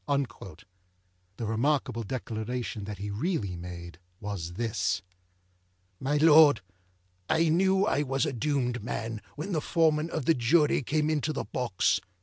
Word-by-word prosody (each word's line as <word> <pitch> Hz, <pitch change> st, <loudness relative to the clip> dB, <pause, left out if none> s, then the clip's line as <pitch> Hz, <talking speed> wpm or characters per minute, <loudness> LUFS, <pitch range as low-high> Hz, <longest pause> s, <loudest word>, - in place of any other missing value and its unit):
â 120 Hz, -, -3 dB, 0.7 s
The 115 Hz, -, -3 dB
remarkable 115 Hz, +2 st, 0 dB
declaration 115 Hz, -1 st, -4 dB
that 105 Hz, 0 st, -6 dB
he 100 Hz, +2 st, -5 dB
really 105 Hz, -, -2 dB
made 85 Hz, -1 st, -8 dB, 0.2 s
was 95 Hz, -5 st, -5 dB
this: 100 Hz, -3 st, -1 dB, 1.0 s
â_My 145 Hz, +3 st, +1 dB
Lord_, 155 Hz, -3 st, +7 dB, 0.7 s
I 165 Hz, 0 st, +3 dB
knew 190 Hz, +4 st, +3 dB
I 145 Hz, -, +1 dB
was 135 Hz, -2 st, 0 dB
a -, -, -2 dB
doomed 125 Hz, -2 st, -1 dB
man, 115 Hz, -1 st, -4 dB
when 160 Hz, +7 st, -5 dB
the 160 Hz, -4 st, 0 dB
Foreman 160 Hz, 0 st, +2 dB
of 155 Hz, -5 st, -3 dB
my 165 Hz, -, +6 dB
Jury 145 Hz, +5 st, +3 dB
came 150 Hz, +3 st, 0 dB
into 155 Hz, 0 st, 0 dB
the 150 Hz, -, -3 dB
box. 120 Hz, -7 st, 0 dB
125 Hz, 140 wpm, -28 LUFS, 105-155 Hz, 1.0 s, Lord